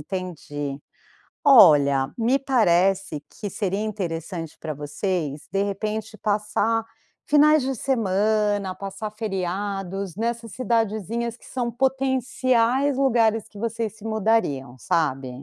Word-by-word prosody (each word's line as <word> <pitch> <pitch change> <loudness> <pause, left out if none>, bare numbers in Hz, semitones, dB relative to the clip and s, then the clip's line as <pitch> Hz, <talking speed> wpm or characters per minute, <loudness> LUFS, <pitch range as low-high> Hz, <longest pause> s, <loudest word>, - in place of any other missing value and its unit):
entendi. 150 -5 -5 0.6
Olha, 145 - +6
me 240 +4 +2
parece 195 - +2
que 205 - -6
seria 195 0 -2
interessante 170 -6 -4
pra 155 -1 -4
vocês, 150 0 -3
de 195 +2 +1
repente, 215 +2 -3
passar 215 +2 0 0.4
finais 300 0 +5
de 270 +1 -1
semana, 210 -4 +1
passar 195 +3 -6
feriados 195 -2 -3
nessas 230 +1 -3
cidadezinhas 230 0 -1
que - - -17
são 245 -2 -2
potenciais 260 0 +1
lugares 230 -5 +2
que 205 - -13
vocês 225 -1 -3
se 215 - -15
mudariam, 220 - 0
sabe. 135 -3 -1
210 Hz, 110 wpm, -24 LUFS, 180-230 Hz, 0.6 s, Olha